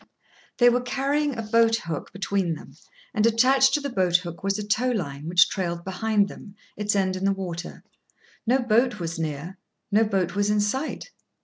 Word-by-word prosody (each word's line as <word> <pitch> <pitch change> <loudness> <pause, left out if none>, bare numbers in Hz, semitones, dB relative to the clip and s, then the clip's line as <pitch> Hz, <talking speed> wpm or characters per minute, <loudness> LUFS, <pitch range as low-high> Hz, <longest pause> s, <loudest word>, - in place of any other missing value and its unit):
They 245 - +5
were 245 +1 +1
carrying 275 +2 -1
a 225 - -3
boat 225 +1 +3
hook 170 -8 -5
between 195 -3 -1
them, - - -13 0.4
and, 215 -3 +1
attached 260 +4 +4
to - - +1
the 280 -1 -4
boat 185 -5 +1
hook 175 -2 -8
was 195 +1 0
a 210 - -4
tow 235 +5 +1
line, 155 - -3
which 175 0 +5
trailed 170 -3 -3
behind 200 +2 +1
them, 200 0 -12 0.2
its 210 0 -1
end 190 -1 +1
in 185 - -5
the 195 - +3
water. 175 -3 -6 0.6
No 250 +3 +4
boat 240 -1 +2
was 170 -1 -4
near, 160 +3 -5 0.3
no 215 +2 +4
boat 190 -5 0
was 205 +1 0
in 210 0 +2
sight. 265 - -2
205 Hz, 190 wpm, -25 LUFS, 180-230 Hz, 0.6 s, They